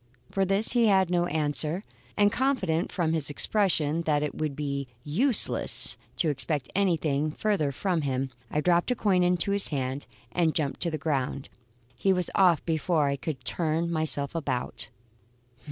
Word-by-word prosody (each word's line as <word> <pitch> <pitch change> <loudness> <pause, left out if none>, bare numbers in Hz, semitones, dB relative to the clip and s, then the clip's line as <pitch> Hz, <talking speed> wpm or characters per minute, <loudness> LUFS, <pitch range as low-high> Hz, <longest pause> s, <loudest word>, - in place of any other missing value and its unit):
For 195 0 +1
this 195 +3 +3
he 235 -2 +3
had 190 -3 +3
no 175 -1 +2
answer; 155 +3 -1 0.3
and 205 0 +4
confident 205 -12 0
from 170 -3 0
his 155 -3 +2
expression 165 -1 +1
that 150 -3 +1
it 150 - -2
would 155 -3 -3
be 140 -2 -3 0.2
useless 220 - +2 0.2
to 165 - +1
expect 145 -1 -1
anything 160 -6 +1
further 155 -3 0
from 175 +4 -1
him, 135 -1 -2 0.2
I 150 - 0
dropped 175 +4 +2
a 250 - +1
coin 195 -5 +2
into 180 +2 +2
his 200 0 0
hand, 135 -1 -3 0.2
and 165 0 +1
jumped 145 -4 -1
to 170 - 0
the 155 - -3
ground. 140 -3 -2 0.5
He 190 +10 +2
was 180 -2 -1
off 180 -6 +3
before 160 -2 +1
I 140 - 0
could 140 -2 -5
turn 165 +2 -1
myself 155 -3 -1
about. 140 -7 -3
160 Hz, 165 wpm, -27 LUFS, 145-185 Hz, 0.5 s, and